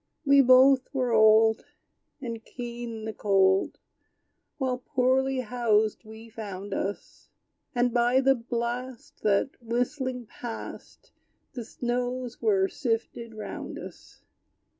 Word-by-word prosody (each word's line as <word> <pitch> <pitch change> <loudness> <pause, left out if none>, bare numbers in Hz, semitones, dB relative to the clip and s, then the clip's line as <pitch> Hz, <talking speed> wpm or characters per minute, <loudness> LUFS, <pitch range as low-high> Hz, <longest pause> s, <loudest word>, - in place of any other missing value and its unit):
We 280 0 +6
both 260 +1 +5
were 250 -3 0
old, 220 0 +5 0.6
And 230 -3 -6
keen 235 -2 -7
the 220 - -4
cold; 195 -2 +2 0.8
While 255 -2 -1
poorly 260 0 +1
housed 220 -2 0
we 220 +1 -11
found 205 -3 -7
us; 200 +1 -5 0.5
And 245 -1 +2
by 240 +1 +3
the 270 0 +4
blast 240 0 -5
That, 210 +5 +2
whistling, 250 +2 -2
passed, 230 +1 -9 0.4
The 245 - -5
snows 245 +1 -3
were 195 -4 +3
sifted 230 -1 -3
round 215 - -7
us. - - -12
235 Hz, 110 wpm, -27 LUFS, 220-255 Hz, 0.8 s, We